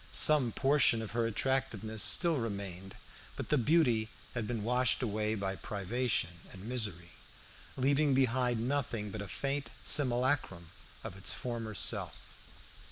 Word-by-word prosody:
Some 145 -6 +4
portion 135 -4 +3
of 110 - -7
her 115 0 0
attractiveness 115 -3 -1
still 160 - +3
remained, 100 -5 -5 0.4
but - - -6
the 150 - +3
beauty 120 -6 +2 0.2
had 120 -3 -3
been 115 -4 -3
washed 125 +2 +2
away 110 -1 -1
by 100 -2 -3
privation 100 -4 -2
and 95 -1 -10
misery, 105 -8 -3 0.7
leaving 140 +1 +2
behind 125 -2 +1
nothing 120 -7 -2
but 110 - -5
a 100 - -6
faint 140 +6 -3
simulacrum 125 - +1 0.3
of - - -7
its 95 - -1
former 115 -3 -5
self. - - +1
115 Hz, 135 wpm, -32 LUFS, 105-130 Hz, 0.7 s, Some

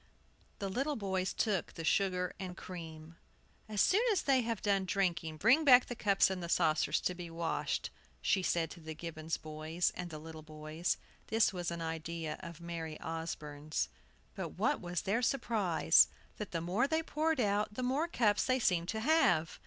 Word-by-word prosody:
The 200 - -3
little 270 +10 -1
boys 190 -4 -1
took 205 -6 -1
the 165 - -6
sugar 180 +1 +1
and 185 -1 -6
cream. 165 -2 -9 0.5
"As 210 -2 +1
soon 405 +4 +4
as 390 - +1
they 270 -2 +4
have 230 -3 -2
done 200 -2 +2
drinking 170 -4 -1
bring 250 - +5
back 255 -4 +8
the 245 - -5
cups 195 -4 +3
and 185 -2 -3
saucers 155 -1 +2
to 180 - 0
be 175 -1 -7
washed," 165 0 -2 0.3
she 190 - +2
said 170 -3 0
to 175 - -10
the 160 -1 -7
Gibbons 160 0 -4
boys 155 +3 -2
and 180 -1 -5
the 155 - -7
little 160 +1 -9
boys. 155 +2 -3 0.3
This 225 -2 +3
was 175 -2 -2
an 170 -1 -4
idea 160 -1 -4
of 170 -1 -9
Mary 165 -2 -5
Osborne's. 155 -2 -4 0.4
But - - -6
what - - +1
was 175 0 -3
their 220 +5 +1
surprise, 210 -10 +4 0.3
that 210 - -5
the 165 - -3
more 190 +10 +1
they 320 +2 0
poured 315 -1 0
out, 210 -1 +1
the 255 - -3
more 270 +6 +1
cups 215 -10 +2
they 255 0 +2
seemed 175 -8 +1
to 220 0 -2
have! 200 - +3
180 Hz, 180 wpm, -33 LUFS, 165-220 Hz, 0.5 s, back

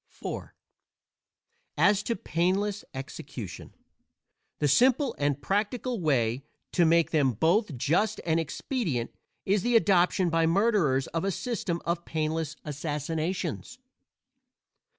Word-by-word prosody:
IV - - -3 1.3
As 205 -1 +4
to 230 +2 -2
painless 190 +5 0
execution, 135 -2 -8 0.8
the 150 - +1
simple 255 - +4
and 145 -1 +1
practical 220 - -1
way 125 -5 +1 0.3
to 175 - +3
make 165 0 +3
them 140 -5 +2
both 165 - +1
just 195 - +1
and 165 -1 +2
expedient 160 - -2 0.3
is 200 +1 +2
the 240 +4 +1
adoption 185 -4 +3
by 165 0 +3
murderers 170 - +2
of 165 - -2
a 195 - +1
system 195 -4 -3
of 170 0 -1
painless 155 -1 -2
assassinations. 155 - -3
170 Hz, 110 wpm, -28 LUFS, 150-205 Hz, 1.3 s, As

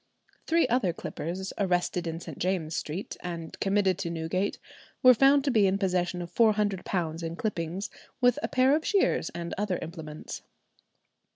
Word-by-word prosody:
Three 330 +1 +3
other 220 -8 +1
clippers 180 +4 -5
arrested 180 -2 0
in 165 0 -3
St. - - -9
James's 175 -4 -1
St., 165 +7 -5
and 170 -2 -6
committed 195 -2 +2
to 170 - -2
Newgate, 170 +4 -1 0.5
were 255 0 +10
found 275 +3 +5
to 275 - +1
be 215 -5 +4
in 190 +1 +2
possession 180 -2 0
of 175 0 -10
£400 195 -7 +1
in 165 0 -4
clippings, 185 -2 -3 0.3
with 245 +1 +4
a - - -1
pair 265 0 +4
of 315 - -1
shears 400 +1 +2
and 170 0 -4
other 205 -4 0
implements. 160 -2 -7
185 Hz, 160 wpm, -28 LUFS, 170-215 Hz, 0.5 s, were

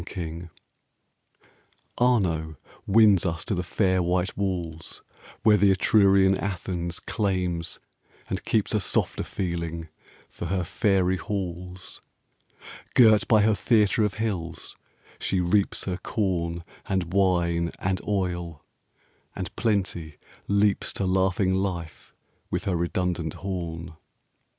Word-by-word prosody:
FLORENCE 85 -1 -6 1.5
Arno 85 -11 +1 0.3
wins 105 -3 +5
us 85 -3 -2
to 110 - -1
the 90 - 0
fair 95 +1 +1
white 90 +1 0
walls, 85 -5 -4 0.4
Where 105 -1 +6
the 100 0 +4
Etrurian 95 0 +4
Athens 90 -3 -3
claims 90 -5 -1 0.5
and - - -3
keeps 110 -1 0
A 105 - +3
softer 95 - 0
feeling 85 -3 -4 0.4
for - - -8
her 90 +1 0
fairy 95 0 +1
halls. 90 -2 -5 0.9
Girt 110 -4 +6
by 110 -2 +5
her 110 +1 +4
theatre 105 0 +3
of 105 -2 0
hills, 95 -7 -4 0.4
she 95 - 0
reaps 95 +3 +1
Her 90 -2 -3
corn, 85 -5 -2 0.2
and 90 -3 -1
wine, 85 -3 +2
and 95 0 -1
oil, 85 -5 -2 0.7
and 95 -1 -5
Plenty 95 -8 -1 0.3
leaps 100 0 +2
5 - - -3
To 100 - -1
laughing 95 0 +2
life, 95 -4 -3 0.4
with - - -2
her 95 - 0
redundant 85 -1 -1
horn. 85 -4 -5
95 Hz, 115 wpm, -26 LUFS, 85-100 Hz, 1.5 s, Where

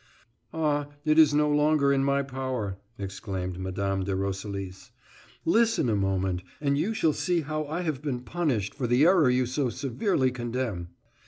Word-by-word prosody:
"Ah, 150 -2 0 0.2
it 155 +1 +4
is 155 -2 +7
no 150 +1 +3
longer 150 -1 +3
in 135 0 +2
my 140 0 +2
power," 130 -7 -3 0.2
exclaimed 95 -2 -5
Mme. 95 +1 -2
de 95 0 -1
Roselis. 95 0 -4 0.6
"Listen 225 - +3
a 110 - +2
moment, 95 -2 0 0.2
and 140 -1 +1
you 205 +10 0
shall 160 -7 +2
see 170 +4 0
how 155 +1 -3
I 160 +4 -3
have 155 -6 -2
been 135 -5 -3
punished 125 - -1
for 130 -4 -2
the 125 +5 +4
error 175 -6 +5
you 125 0 +2
so 130 +1 -1
severely 130 - 0
condemn." 120 -7 -3
130 Hz, 165 wpm, -27 LUFS, 100-150 Hz, 0.6 s, is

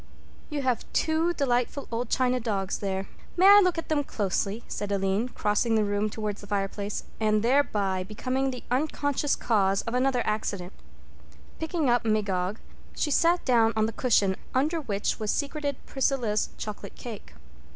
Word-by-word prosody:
"You 295 -3 -3
have 250 -3 -1
two 320 +2 +2
delightful 270 -2 0
old 235 +2 -2
china 255 -1 +2
dogs 200 -5 -2
there. 195 -1 -2 0.3
May 370 - +5
I 405 +1 +10
look 365 -2 +1
at 330 - -3
them 300 -2 +1
closely?" 205 -1 -2
said 205 -1 -4
Aline, 200 +4 0
crossing 215 +1 +1
the 215 - +3
room 205 +1 0
towards 210 -1 -4
the 205 - -11
fireplace 200 0 -2 0.2
and 215 -1 +2
thereby 210 -7 +2
becoming 255 +7 -2
the 250 -2 -6
unconscious 285 +1 0
cause 195 -4 +1
of 230 - -4
the 250 +1 +2
other 260 -3 +2
accident. 200 -4 -2 0.9
Picking 320 -2 -1
up 240 -1 +3
Magog, 205 -3 0 0.4
she 295 - 0
sat 340 +4 +3
down 230 -3 +4
on 220 0 +2
the 225 - -3
cushion 205 -6 +2 0.2
under 310 +5 +1
which 205 -6 -2
was 215 -1 -2
secreted 285 +1 -1
Priscilla's 250 -5 0
chocolate 210 -1 -7
cake. 215 - -9
230 Hz, 160 wpm, -27 LUFS, 205-275 Hz, 0.9 s, I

